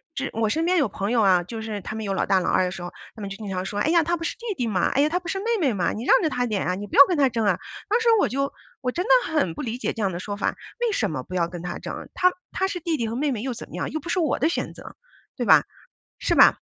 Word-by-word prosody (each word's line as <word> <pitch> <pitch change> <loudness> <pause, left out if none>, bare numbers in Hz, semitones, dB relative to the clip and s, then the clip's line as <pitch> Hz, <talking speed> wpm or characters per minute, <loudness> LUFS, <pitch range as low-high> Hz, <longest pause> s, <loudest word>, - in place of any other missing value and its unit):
是 275 - -2
我 220 -1 0
身 320 +8 0
边 365 +1 +2
有 290 - +2
朋 200 +2 -3
友 235 -2 +3
啊， 185 -3 +5
就 220 +6 -7
是 220 -2 -4
他 210 +3 -6
们 220 - -4
有 200 -2 -2
老 190 - 0
大 190 -1 +3
老 - - -1
二 185 - +3
的 180 - -2
时 180 - -7
候， 175 - -6 0.2
他 220 - -10
们 200 - -4
就 195 - -7
经 210 -3 -7
常 185 -1 -2
说， 205 +2 -4
哎 295 - +1
呀， 335 -1 +5
他 345 +3 0
不 330 - -5
是 - - -2
弟 - - -24 0.2
弟 245 - -1
吗？ 190 -5 +1
哎 275 - +1
呀， 295 - +4
她 345 - 0
不 345 - -7
是 385 - -2
妹 405 - -6 0.2
妹 270 -5 +3
吗？ 190 -4 0
你 220 - -5
让 - - +5
着 320 - +1
他 250 -3 -1
点 210 -4 -1
啊， 180 - 0
你 205 +2 -5
不 - - -7
要 - - +11
跟 360 - 0
他 275 -2 +4
争 230 -3 -1
啊， 185 -3 +3 0.3
当 440 +3 +3
时 465 - 0
我 - - +3
就 275 +2 -1 0.3
我 250 - -1
真 355 +7 -2
的 - - +1 0.2
很 235 - +1
不 - - -6
理 235 0 -3
解 250 - -2
这 225 - -5
样 195 -2 +1
的 175 - -5
说 205 +2 -4
法， - - 0 0.3
为 475 - +2
什 220 - 0
么 130 -5 -4
不 185 - -11
要 170 -2 +1
跟 175 -1 -8
他 175 0 -5
争， - - -7
他 365 0 +3 0.2
他 380 - 0
是 360 -3 -5
弟 325 -2 -1
弟 230 -2 -1
和 225 - -4
妹 285 +2 0
妹 220 - -3
又 255 +1 -2
怎 235 - -9
么 - - -14
样？ - - -2
又 315 - -4
不 340 - -8
是 365 - +1
我 320 - +1
的 315 - +2
选 - - -3
择， - - -12 0.4
对 - - -1
吧？ - - +7 0.6
是 - - +1
吧？ - - +7
230 Hz, 365 characters per minute, -24 LUFS, 195-315 Hz, 0.6 s, 要